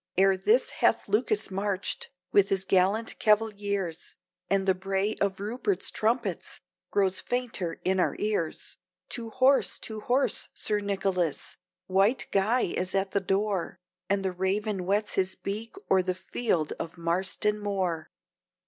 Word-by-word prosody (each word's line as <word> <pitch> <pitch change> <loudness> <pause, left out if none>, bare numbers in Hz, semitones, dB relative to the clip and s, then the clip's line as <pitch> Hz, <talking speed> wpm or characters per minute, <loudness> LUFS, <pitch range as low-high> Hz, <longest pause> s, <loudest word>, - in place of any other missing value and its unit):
Ere 195 0 +5
this 435 - +3
hath - - +2
Lucas 420 - +1
marched, 195 0 -2 0.2
with 200 -1 +5
his 190 -1 +1
gallant 195 +4 +2
cavaliers, 205 -5 0 0.3
And 195 -1 +2
the 190 - +6
bray 195 +3 -1
of 195 -1 +1
Rupert's 245 - -1
trumpets 230 +4 -1 0.3
grows 190 -2 +2
fainter 240 -9 -2
in 190 0 +2
our - - +2
ears. 205 -7 -2 0.3
To 230 -2 -5
horse! 260 +4 +3
to 220 -1 -6
horse! 255 +5 +1
Sir 210 -1 0
Nicholas! 195 -5 -1 0.3
White 195 +6 +2
Guy 215 +6 +3
is 185 +2 -1
at 195 0 +1
the 200 - +2
door, 195 0 -1 0.3
And 195 0 +1
the 190 - +1
raven 195 +3 -1
whets 200 +4 0
his 190 -1 0
beak 215 - -5 0.2
o'er 190 - +6
the 185 0 -1
field 185 -4 -1
of 165 +2 -5
Marston 190 +5 0
Moor. 190 -6 -2
195 Hz, 140 wpm, -28 LUFS, 185-215 Hz, 0.3 s, the